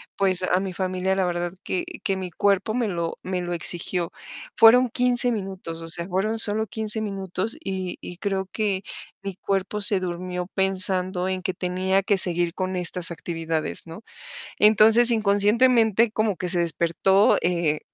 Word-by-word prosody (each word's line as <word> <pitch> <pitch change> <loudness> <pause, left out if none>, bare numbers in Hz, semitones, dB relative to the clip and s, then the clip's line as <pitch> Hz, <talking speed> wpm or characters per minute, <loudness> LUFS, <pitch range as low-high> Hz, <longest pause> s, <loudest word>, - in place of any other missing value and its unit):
pues 190 -2 0
a 185 0 +1
mi 190 -1 -5
familia, 185 +1 -2
la 190 -1 0
verdad 175 0 -3
que 355 -2 -3 0.2
que 195 - -1
mi 185 -2 -6
cuerpo 200 +4 0
me 240 -1 -1
lo 170 -4 -4
me 185 -1 -3
lo 175 0 -4
exigió. 170 +1 -2 0.4
Fueron 245 +3 +6
15 245 +1 +3
minutos, 190 -6 -6
o 165 - -8
sea, 170 +1 -3
fueron 205 +4 -1
solo 220 0 +7
15 220 +1 -3
minutos 195 - -4
y 190 - -4
y 175 - -9
creo 195 -1 -3
que 200 -3 -2 0.4
mi 195 -2 -5
cuerpo 195 +2 -3
se 200 -1 +4
durmió 180 0 -5
pensando 185 -1 -1
en 185 0 -3
que 185 +1 -3
tenía 185 +2 -1
que 200 +1 +1
seguir 175 -2 +3
con 185 0 -3
estas 180 0 -1
actividades, 165 -2 -4
¿no? 165 +4 -10 0.6
Entonces, 220 +3 +6
inconscientemente, 220 +1 +3
como 215 -2 0
que 180 +1 -4
se 175 - +1
despertó, 170 +4 +2
eh 170 -4 0
190 Hz, 165 wpm, -23 LUFS, 180-210 Hz, 0.6 s, solo